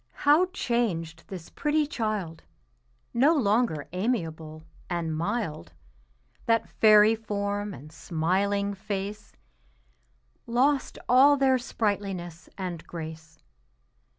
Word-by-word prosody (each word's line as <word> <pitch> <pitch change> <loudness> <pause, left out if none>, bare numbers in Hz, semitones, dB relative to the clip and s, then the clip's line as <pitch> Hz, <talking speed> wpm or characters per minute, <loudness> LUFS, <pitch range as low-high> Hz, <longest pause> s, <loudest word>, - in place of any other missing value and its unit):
how 305 +6 +6
changed 205 - -2
this 180 -4 -9
pretty 300 0 +1
child, 215 - -3 0.7
No 280 +8 +4
longer 215 - +1
amiable 165 -7 -3 0.3
and 170 -3 -2
mild. 165 - -3 0.7
That 230 0 +2
fairy 215 0 +6
form 205 -1 -3
and 155 -4 -11
smiling 190 +6 -1
face 205 +1 -5 1.2
Lost 265 +4 +1
all 275 +4 +6
their 265 -1 +3
sprightliness 195 -7 -3
and 180 -4 -5
grace. 160 -1 -8
200 Hz, 95 wpm, -27 LUFS, 165-235 Hz, 1.2 s, how